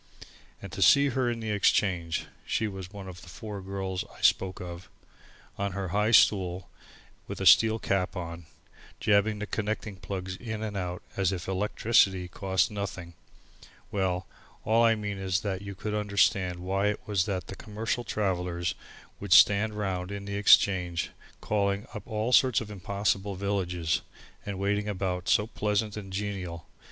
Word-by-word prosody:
And 100 Hz, -, -7 dB
to 90 Hz, -, -6 dB
see 140 Hz, -, +6 dB
her 130 Hz, -1 st, 0 dB
in 115 Hz, -1 st, -3 dB
the 110 Hz, -1 st, -3 dB
Exchange, 95 Hz, -5 st, +1 dB, 0.2 s
she 110 Hz, -, -1 dB
was 95 Hz, -3 st, -7 dB
one 100 Hz, -2 st, -8 dB
of 90 Hz, -2 st, -9 dB
the 90 Hz, -, -13 dB
four 105 Hz, +3 st, -7 dB
girls 95 Hz, -1 st, -3 dB
that -, -, -9 dB
I -, -, -15 dB
spoke 95 Hz, -1 st, +2 dB
of, 90 Hz, 0 st, -8 dB, 0.7 s
on 100 Hz, -1 st, -1 dB
her 95 Hz, -2 st, -3 dB
high 105 Hz, +4 st, +1 dB
stool 95 Hz, -4 st, +4 dB, 0.6 s
with -, -, -6 dB
a -, -, -2 dB
steel 110 Hz, 0 st, +7 dB
cap 95 Hz, -4 st, -1 dB
on, 85 Hz, -2 st, -6 dB, 0.5 s
jabbing 105 Hz, 0 st, +3 dB
the 105 Hz, -, -4 dB
connecting 105 Hz, -1 st, -3 dB
plugs 95 Hz, -1 st, -5 dB
in 110 Hz, -1 st, -5 dB
and 105 Hz, -2 st, -4 dB
out 90 Hz, -2 st, -4 dB
as 95 Hz, -2 st, +1 dB
if 90 Hz, -3 st, -5 dB
electricity 95 Hz, -1 st, +2 dB
cost 95 Hz, +2 st, 0 dB
nothing 95 Hz, -4 st, -5 dB, 0.8 s
well, 95 Hz, -2 st, -1 dB, 0.4 s
all 115 Hz, +2 st, +4 dB
I 115 Hz, -1 st, +5 dB
mean 105 Hz, -2 st, -4 dB
is 95 Hz, -1 st, 0 dB
that 95 Hz, -2 st, -3 dB
you 100 Hz, -1 st, -7 dB
could 105 Hz, +2 st, -4 dB
understand 100 Hz, -3 st, +1 dB
why 95 Hz, +2 st, 0 dB
it 105 Hz, -, -1 dB
was 100 Hz, -4 st, +1 dB
that 95 Hz, -4 st, -3 dB
the 100 Hz, -, -8 dB
commercial 110 Hz, +4 st, -3 dB
travellers 90 Hz, -5 st, -1 dB, 0.5 s
would 100 Hz, -2 st, +1 dB
stand 105 Hz, +1 st, +6 dB
round 95 Hz, -3 st, -3 dB
in 100 Hz, 0 st, -5 dB
the 100 Hz, 0 st, -4 dB
Exchange 95 Hz, -4 st, +4 dB, 0.3 s
calling 100 Hz, -1 st, 0 dB
up 105 Hz, -3 st, -8 dB
all 110 Hz, +1 st, -1 dB
sorts 130 Hz, -2 st, +5 dB
of 105 Hz, -2 st, -7 dB
impossible 100 Hz, 0 st, -1 dB
villages, 90 Hz, -4 st, -1 dB, 0.5 s
and 100 Hz, -2 st, -3 dB
waiting 100 Hz, +2 st, 0 dB
about 90 Hz, -2 st, -2 dB
so 105 Hz, -3 st, +4 dB
pleasant 105 Hz, -1 st, -1 dB
and 100 Hz, -3 st, -7 dB
genial! 95 Hz, -4 st, -4 dB
100 Hz, 165 wpm, -28 LUFS, 90-105 Hz, 0.8 s, steel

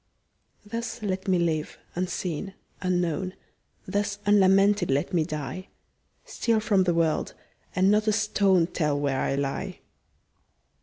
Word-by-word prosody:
Thus 230 Hz, +1 st, -5 dB
let 190 Hz, -1 st, -2 dB
me 185 Hz, -1 st, +3 dB
live, 160 Hz, -3 st, -1 dB, 0.2 s
unseen, 180 Hz, +1 st, -3 dB, 0.3 s
unknown; 180 Hz, -1 st, -1 dB, 0.5 s
Thus 205 Hz, +1 st, -1 dB
unlamented 200 Hz, -1 st, +4 dB
let 140 Hz, +7 st, 0 dB
me 170 Hz, -3 st, +3 dB
die; 155 Hz, +4 st, -5 dB, 0.6 s
Steal 230 Hz, -2 st, 0 dB
from 205 Hz, -4 st, +2 dB
the 175 Hz, -2 st, +2 dB
world, 165 Hz, -2 st, 0 dB, 0.4 s
and 190 Hz, +2 st, +4 dB
not 210 Hz, +1 st, +2 dB
a -, -, +5 dB
stone 200 Hz, -4 st, +3 dB
Tell 150 Hz, -4 st, -1 dB
where 140 Hz, -2 st, 0 dB
I 135 Hz, -, 0 dB
lie. 140 Hz, -1 st, -3 dB
185 Hz, 125 wpm, -26 LUFS, 165-205 Hz, 0.6 s, a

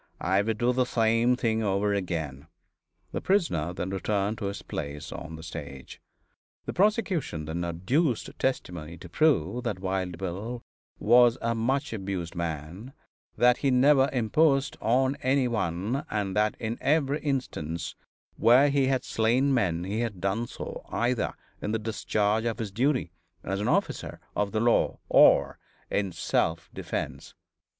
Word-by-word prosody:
I 95 Hz, +2 st, +2 dB
would 110 Hz, +1 st, -1 dB
do 120 Hz, +3 st, +2 dB
the 125 Hz, 0 st, +2 dB
same 115 Hz, +2 st, +3 dB
thing 115 Hz, -3 st, 0 dB
over 100 Hz, 0 st, +1 dB
again." 80 Hz, -7 st, -3 dB, 0.6 s
The -, -, -3 dB
prisoner 165 Hz, -, +1 dB
then 90 Hz, +1 st, -4 dB
returned 100 Hz, +2 st, -1 dB
to -, -, -3 dB
his 100 Hz, 0 st, -4 dB
place 75 Hz, +1 st, -6 dB
on 80 Hz, 0 st, -7 dB
the 80 Hz, -, -10 dB
stage. 70 Hz, -5 st, -8 dB, 0.6 s
The -, -, -4 dB
prosecution 185 Hz, -, +1 dB
then 80 Hz, +3 st, -3 dB
adduced 110 Hz, -, 0 dB
testimony 85 Hz, -11 st, -2 dB
to 90 Hz, -, -11 dB
prove 120 Hz, -, +1 dB
that 110 Hz, -5 st, -1 dB
Wild 95 Hz, -2 st, -2 dB
Bill 100 Hz, +7 st, -5 dB, 0.3 s
was 120 Hz, +2 st, +5 dB
a 115 Hz, 0 st, 0 dB
much 120 Hz, +3 st, -1 dB
abused 95 Hz, -5 st, -4 dB
man; 85 Hz, -, -5 dB, 0.4 s
that 125 Hz, +2 st, +5 dB
he 140 Hz, -, +1 dB
never 135 Hz, +1 st, +5 dB
imposed 135 Hz, +4 st, +2 dB
on 130 Hz, +4 st, +2 dB
any 130 Hz, 0 st, +2 dB
one, 110 Hz, -, -1 dB
and 100 Hz, -3 st, -2 dB
that 105 Hz, 0 st, +2 dB
in 115 Hz, 0 st, -3 dB
every 145 Hz, -1 st, +2 dB
instance 85 Hz, -, -3 dB, 0.4 s
where 130 Hz, +5 st, +5 dB
he 140 Hz, -2 st, +2 dB
had 130 Hz, -1 st, +1 dB
slain 125 Hz, +5 st, +2 dB
men 90 Hz, -9 st, +1 dB
he 100 Hz, +4 st, -2 dB
had 115 Hz, -6 st, -3 dB
done 100 Hz, +6 st, -1 dB
so -, -, -7 dB
either 120 Hz, 0 st, 0 dB, 0.3 s
in 105 Hz, -, -2 dB
the -, -, +2 dB
discharge 110 Hz, 0 st, 0 dB
of 115 Hz, -1 st, -1 dB
his 110 Hz, -3 st, -4 dB
duty 125 Hz, -, 0 dB, 0.3 s
as 95 Hz, +1 st, -2 dB
an -, -, -1 dB
officer -, -, -1 dB, 0.2 s
of 105 Hz, -1 st, 0 dB
the 110 Hz, -, 0 dB
law 120 Hz, +1 st, +2 dB
or -, -, +5 dB, 0.3 s
in 100 Hz, -2 st, 0 dB
self 80 Hz, -1 st, -1 dB
defense. -, -, -5 dB
110 Hz, 155 wpm, -27 LUFS, 90-125 Hz, 0.6 s, was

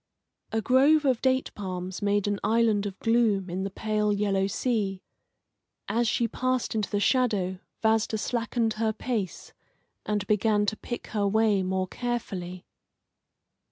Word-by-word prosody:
A 220 Hz, 0 st, 0 dB
grove 280 Hz, +6 st, +4 dB
of 255 Hz, -4 st, +2 dB
date 260 Hz, 0 st, +1 dB
palms 185 Hz, -2 st, -5 dB
made 205 Hz, 0 st, +1 dB
an 205 Hz, -1 st, -1 dB
island 220 Hz, -3 st, +2 dB
of 195 Hz, -1 st, -7 dB
gloom 220 Hz, -5 st, +2 dB
in 185 Hz, +2 st, -2 dB
the 195 Hz, -, -2 dB
pale 210 Hz, +1 st, 0 dB
yellow 200 Hz, -1 st, +1 dB
sea. 200 Hz, -4 st, -1 dB, 0.8 s
As 235 Hz, +1 st, +1 dB
she 235 Hz, +1 st, +1 dB
passed 255 Hz, +2 st, -1 dB
into 215 Hz, -2 st, -1 dB
the 205 Hz, -, 0 dB
shadow 205 Hz, -6 st, +1 dB, 0.2 s
Vasda 220 Hz, 0 st, +2 dB
slackened 230 Hz, 0 st, -1 dB
her 220 Hz, -1 st, +1 dB
pace, 215 Hz, -5 st, -4 dB, 0.5 s
and 210 Hz, -1 st, -1 dB
began 210 Hz, 0 st, +2 dB
to 210 Hz, -, 0 dB
pick 240 Hz, +2 st, -6 dB
her 205 Hz, -2 st, +1 dB
way 215 Hz, -1 st, +3 dB
more 185 Hz, 0 st, -1 dB
carefully. 190 Hz, -7 st, -4 dB
210 Hz, 145 wpm, -27 LUFS, 195-235 Hz, 0.8 s, grove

